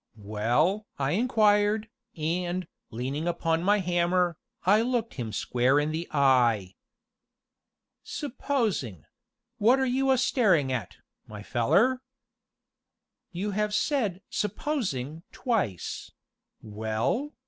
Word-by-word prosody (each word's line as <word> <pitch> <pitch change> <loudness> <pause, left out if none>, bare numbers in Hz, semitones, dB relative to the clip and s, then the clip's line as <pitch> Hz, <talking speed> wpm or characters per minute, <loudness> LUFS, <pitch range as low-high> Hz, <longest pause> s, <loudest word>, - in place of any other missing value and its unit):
"Well?" 120 - 0
I 135 0 0
inquired, 210 - +3 0.3
and, 175 +3 -2 0.2
leaning 135 +7 -3
upon 165 -1 0
my 205 +4 +3
hammer, 175 0 +1 0.3
I 205 +4 +5
looked 235 -1 -1
him 115 -5 -5
square 125 +5 +2
in 150 +1 0
the 165 +2 -3
eye. 120 -9 +3 1.3
"Supposing 225 - -2 0.5
wot 235 +5 +5
are 265 - +2
you 265 +1 +1
a 265 - +5
staring 195 - +2
at, 120 -8 -4 0.3
my 105 -1 -9
feller?" 205 - +2 1.3
"You 190 +4 -3
have 210 +1 -1
said 215 - 0
'supposing' 185 - -2
twice 200 - -2 0.5
well?" 110 - -2
175 Hz, 105 wpm, -27 LUFS, -, 1.3 s, I